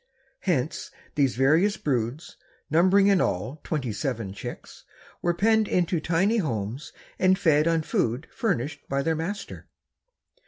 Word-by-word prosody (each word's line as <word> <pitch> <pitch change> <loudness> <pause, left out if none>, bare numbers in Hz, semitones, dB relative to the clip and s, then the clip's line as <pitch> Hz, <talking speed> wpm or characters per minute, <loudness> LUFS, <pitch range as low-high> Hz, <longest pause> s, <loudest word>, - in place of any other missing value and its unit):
Hence 160 -6 -1 0.2
these 135 -4 +1
various 160 - +3
broods, 130 +2 -2 0.4
numbering 185 +5 +5
in 200 -2 +4
all 115 - -2
twenty 135 -8 -2
seven 115 -6 -3
chicks, - - -9 0.4
were 175 0 +1
penned 220 +3 +3
into 175 -1 +1
tiny 185 +8 +1
homes 120 - -3 0.3
and 185 0 +4
fed 155 -5 +3
on 165 -1 +2
food 125 +1 -1
furnished 145 - -2
by 140 0 0
their 160 +2 +1
master. 200 +6 -5
155 Hz, 130 wpm, -26 LUFS, 135-185 Hz, 0.4 s, numbering